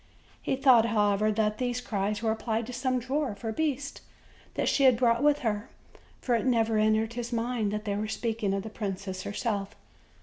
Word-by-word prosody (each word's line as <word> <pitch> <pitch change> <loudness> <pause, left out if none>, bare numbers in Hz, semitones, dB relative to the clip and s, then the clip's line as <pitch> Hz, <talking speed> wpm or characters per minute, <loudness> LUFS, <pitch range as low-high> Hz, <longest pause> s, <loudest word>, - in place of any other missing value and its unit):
He - - 0
thought, 260 -4 +5
however, 210 -1 +2
that 215 0 0
these 245 -1 -1
cries 210 -2 -2
were 220 - +2
applied 225 0 -2
to 250 - -7
some 255 0 0
dwarf 255 -3 -2
or 225 - -1
beast 285 +1 -2 0.5
that - - 0
she 275 - +3
had 255 -3 +6
brought 235 0 +3
with 295 0 +3
her; 210 +2 -1 0.5
for 245 - -1
it 230 - +2
never 225 -3 +2
entered 220 +1 +2
his 240 0 -5
mind 230 -2 -1
that 210 +1 -4
they 200 -1 -1
were 210 +1 -2
speaking 220 -2 -2
of 195 - -3
the 220 - -7
princess 195 -3 -4
herself. 205 -1 -3
225 Hz, 195 wpm, -28 LUFS, 210-245 Hz, 0.5 s, had